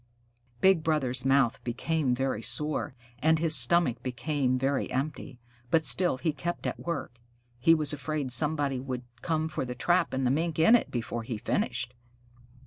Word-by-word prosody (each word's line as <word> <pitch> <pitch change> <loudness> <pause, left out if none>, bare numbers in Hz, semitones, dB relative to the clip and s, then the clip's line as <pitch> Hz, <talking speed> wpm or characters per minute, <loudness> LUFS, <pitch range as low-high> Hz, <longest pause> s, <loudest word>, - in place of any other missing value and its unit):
Big 190 -3 +5
Brother's 135 -5 -1
mouth 135 -3 +2
became 130 +2 -1
very 130 -3 -2
sore, 150 +1 -2 0.2
and 160 +4 +3
his 160 -1 +4
stomach 135 +1 +4
became 130 +1 -1
very 135 +1 -1
empty, 135 0 -4 0.3
but 160 +2 +2
still 175 -7 +3
he 155 +4 -1
kept 175 +3 -5
at - - -3
work. 165 -8 -5 0.4
He 165 +7 +5
was 150 -2 -1
afraid 150 -2 -3
somebody 145 +1 +2
would 130 -1 -5 0.2
come 160 -1 -1
for 155 -3 -3
the 125 -1 -5
trap 175 +4 +1
and 130 0 -1
the 125 - +2
Mink 160 +3 -1
in 165 +8 +5
it, 240 - +3
before 120 -1 -4
he 115 0 -5
finished. 125 +2 -2
140 Hz, 165 wpm, -28 LUFS, 125-160 Hz, 0.4 s, Big